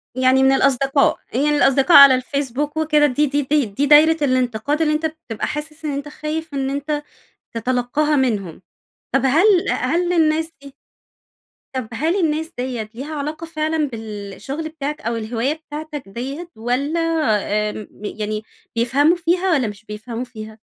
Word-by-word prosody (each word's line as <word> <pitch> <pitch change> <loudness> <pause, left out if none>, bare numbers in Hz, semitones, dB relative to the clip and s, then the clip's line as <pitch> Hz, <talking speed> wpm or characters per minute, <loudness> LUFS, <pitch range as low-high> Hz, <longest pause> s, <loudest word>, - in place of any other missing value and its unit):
يعني 260 +1 +3
من 265 - +5
الأصدقاء؟ 275 +1 +2 0.2
يعني 280 +5 +2
الأصدقاء 275 +4 +5
على 275 -2 +10
الفيسبوك 280 +3 -3
وكده 305 -1 +3
دي 295 +1 +2
دي 285 +1 0
دي 285 -1 +1
دي 210 +8 -1
دايرة 310 +2 +6
الانتقاد 255 +2 0
اللي 305 -1 +2
أنتَ 310 +1 -1
بتبقى 310 -9 -4
حاسس 305 +1 -6
إن 300 - -1
أنتَ 280 +1 -4
خايف 310 +1 -5
إن 270 -1 -1
أنتَ 290 +2 -2 0.5
تتلقاها 255 +6 0
منهم؟ 210 - -1 0.5
طب - - +3
هل 345 +7 +4
هل 350 +1 0
الناس 320 -1 +2
دي 280 -1 -12 1.0
طب 255 -4 -3
هل 320 +10 0
الناس 320 -1 -1
دِيَّة 245 -4 -4
ليها 295 +5 -6
علاقة 305 +3 -4
فعلًا 310 -1 -1
بالشغل 220 +7 -6
بتاعك 300 0 -5
أو 230 0 -2
الهواية 230 +5 -1
بتاعتك 305 -2 -8
دِيَّة؟ 270 - -6
والَّا 255 +8 -1 0.7
آمم 210 0 -7 0.2
يعني 215 0 -4 0.3
بيفهموا 275 +8 +3
فيها 355 +2 0
والّا 270 -7 +2
مش 205 +1 -9
بيفهموا 225 +3 -6
فيها؟ 220 -3 -10
280 Hz, 150 wpm, -20 LUFS, 245-310 Hz, 1.0 s, على